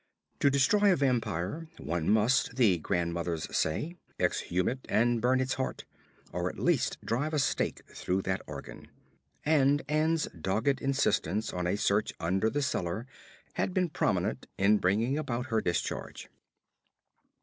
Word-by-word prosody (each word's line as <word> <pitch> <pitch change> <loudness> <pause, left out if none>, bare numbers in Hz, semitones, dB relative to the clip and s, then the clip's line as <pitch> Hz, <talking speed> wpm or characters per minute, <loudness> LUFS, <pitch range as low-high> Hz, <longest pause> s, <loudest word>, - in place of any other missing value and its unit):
To 140 - +4
destroy 195 +10 +4
a - - +4
vampire 125 - -1
one 85 -1 -2
must, 115 +4 +3
the 105 -9 +4
grandmothers 85 -1 -2
say, 155 - -1 0.2
exhume 90 +1 0
it 130 - -1
and 120 +1 +2
burn 130 +2 +3
its 130 0 0
heart, 130 - -3 0.5
or 90 +1 -1
at - - -10
least 145 -7 +1
drive 145 +7 -1
a - - +2
stake 140 - 0
through 95 +1 -2
that 95 0 -1
organ; 70 -2 -9 0.6
and 145 -2 +3
Ann's 155 +2 +1
dogged 105 - 0
insistence 110 - 0
on 90 -1 -1
a 90 - +1
search 105 +1 +1
under 95 +6 +1
the 145 +4 -1
cellar 110 -4 -2 0.5
had 185 - -1
been 180 -2 +2
prominent 105 - -1
in 105 +2 +4
bringing 115 +10 +1
about 130 -3 -3
her 110 - +3
discharge. 85 -1 -3
115 Hz, 145 wpm, -30 LUFS, 90-140 Hz, 0.6 s, To